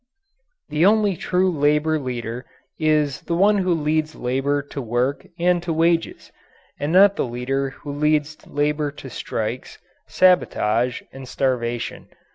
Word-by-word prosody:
The 155 +2 +1
only 205 0 +4
true 185 +2 +1
labour 150 0 +2
leader 125 -2 -5 0.3
is 150 -3 +1
the 170 - -2
one 200 +3 +4
who 185 -1 0
leads 155 -1 0
labour 135 +3 -1
to 145 0 -7
work 120 +3 -1
and 175 0 +2
to 175 -1 -3
wages, 165 +1 0 0.5
and 145 +2 -2
not 200 +3 +6
the - - +1
leader 135 +3 -2
who 145 +2 -9
leads 150 +1 +1
labour 150 0 0
to - - -10
strikes, - - -4 0.3
sabotage, 125 -9 +2
and 135 -1 -9
starvation. 120 -3 -2
150 Hz, 135 wpm, -22 LUFS, 130-170 Hz, 0.5 s, not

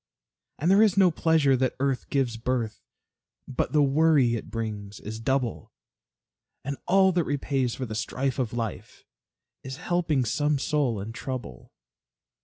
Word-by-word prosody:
And 170 +5 +1
there 200 +2 +6
is 210 -3 +4
no 190 -3 +6
pleasure 155 -4 +3
that 130 0 0
earth 135 -1 -1
gives 130 -4 0
birth, 115 -1 -2 0.7
But 130 - -2
the 150 -2 +4
worry 140 -3 +4
it 115 - -4
brings 105 -3 -5
is 110 +1 -7
double; 130 0 -1 0.9
And 140 +1 -2
all 190 +1 +5
that 175 -1 +1
repays 135 -4 -1
for 130 - -4
the 110 - -6
strife 130 +5 -2
of 120 -4 -1
life, 115 -4 -5 0.6
Is 130 0 -7
helping 165 -6 0
some 145 +5 +1
soul 135 -5 0
in 105 +3 -6
trouble. 125 - -7
135 Hz, 150 wpm, -26 LUFS, 115-150 Hz, 0.9 s, there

